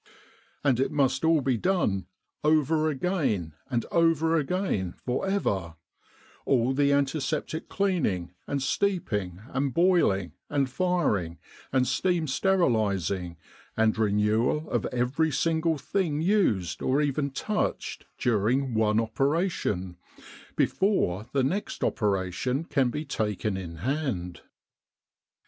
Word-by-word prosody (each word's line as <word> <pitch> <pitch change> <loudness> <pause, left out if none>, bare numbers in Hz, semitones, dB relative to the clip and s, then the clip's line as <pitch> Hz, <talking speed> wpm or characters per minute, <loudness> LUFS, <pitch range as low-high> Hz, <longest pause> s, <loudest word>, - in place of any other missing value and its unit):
And 135 -4 +2
it 135 - +2
must 135 -2 +1
all 160 -2 +4
be 130 -2 +1
done 105 - 0 0.2
' - - -50
over 155 +1 +3
again 135 - -1 0.2
and 120 -3 -1
over 165 -1 +3
again 150 - -1
for 125 +9 -1
ever, 95 - -1 0.7
all 130 0 +2
the 140 +1 +3
antiseptic 140 +2 -1
cleaning, 140 - 0
and 140 -2 -1
steeping, 110 - -1
and 135 0 -1
boiling, 165 - +3 0.2
and 140 -2 +1
firing, 130 - 0 0.3
and 130 -1 +2
steam 175 -3 +1
sterilis 115 - +1
ing, 90 -3 -7 0.4
and 110 -1 +3
renewal 110 +7 +1
of 120 - 0
every 125 +6 0
single 160 +3 +1
thing 165 -2 -1
used 155 - +1
or 135 +2 +2
even 145 -1 0
touched 210 +10 -3
during 120 +3 +1
one 110 -1 +2
operation", 115 - -1 0.6
before 110 - +1
the 135 -1 +1
next 185 +11 -2
opera 100 -5 0
tion 125 - -1
can 135 -6 +1
be 150 +5 -4
taken 105 -5 -2
in 90 -3 -6
hand. 120 - -3
135 Hz, 120 wpm, -27 LUFS, 105-160 Hz, 0.7 s, all